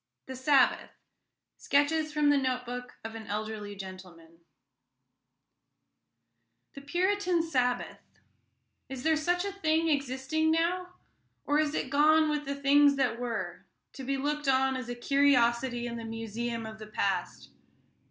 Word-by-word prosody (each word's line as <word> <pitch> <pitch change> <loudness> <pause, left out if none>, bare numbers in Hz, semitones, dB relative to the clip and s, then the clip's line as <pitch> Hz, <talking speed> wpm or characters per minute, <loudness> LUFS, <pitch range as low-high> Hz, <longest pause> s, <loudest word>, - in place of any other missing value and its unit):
THE 260 - -7
SABBATH 260 +1 +3 0.7
SKETCHES 305 +2 +1
FROM 300 -1 +3
A 290 - +4
NOTE 255 -1 -1
BOOK 250 +1 -7
OF 225 0 -6
AN 225 -1 -9
ELDERLY 210 -1 -4
GENTLEMAN 185 -4 -11 2.3
The 275 - -10
Puritan 360 +3 +1
Sabbath 250 -6 -1 0.9
is 260 -1 -6
there 320 0 +3
such 355 +4 0
a 400 - -2
thing 325 -4 +1
existing 285 +2 0
now, 360 +3 0 0.5
or 290 +1 +2
has 305 0 0
it 260 - -3
gone 310 +2 +4
with 295 0 -2
the 280 0 -3
things 280 +1 +4
that 250 -4 0
were, 245 -2 -4 0.3
to 270 - -8
be 275 +1 -1
looked 295 +1 -2
at 265 0 +3
as 255 -1 -5
a 245 - -3
curiosity 240 -2 +2
in 235 -1 -4
the 230 - -6
museum 225 +1 -4
of 220 0 -9
the 215 - -9
past? 190 - -2
265 Hz, 145 wpm, -29 LUFS, 235-300 Hz, 2.3 s, A